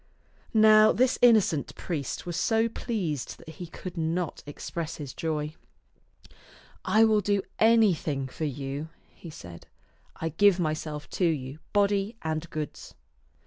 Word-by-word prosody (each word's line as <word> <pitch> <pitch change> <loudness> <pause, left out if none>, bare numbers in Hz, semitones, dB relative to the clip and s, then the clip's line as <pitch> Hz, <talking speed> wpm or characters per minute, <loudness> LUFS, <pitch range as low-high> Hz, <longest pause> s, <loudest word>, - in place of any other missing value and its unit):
Now 215 0 +7
this 255 +1 +2
innocent 215 - +4
priest 150 -7 -4
was 175 -1 -4
so 225 +4 +2
pleased 190 - -3
that - - -13
he 170 +2 -8
could 180 +2 -8
not 165 +1 -2
express 160 +2 -5
his 140 -4 -7
joy. 155 -2 -3 0.7
" - - -23 0.5
I 220 +1 +4
will 215 -1 +3
do 200 0 +1 0.2
anything 185 -12 +3
for 155 +4 -5
you," 140 +2 -4 0.2
he 170 - -11
said. 85 - -11 0.3
" - - -37
I 165 - -3
give 190 +3 +4
myself 155 -2 -3
to - - +5
you, 145 -3 -2
body 205 +1 +1
and 160 +1 -3
goods." 155 -1 -6
165 Hz, 145 wpm, -27 LUFS, 150-205 Hz, 0.7 s, Now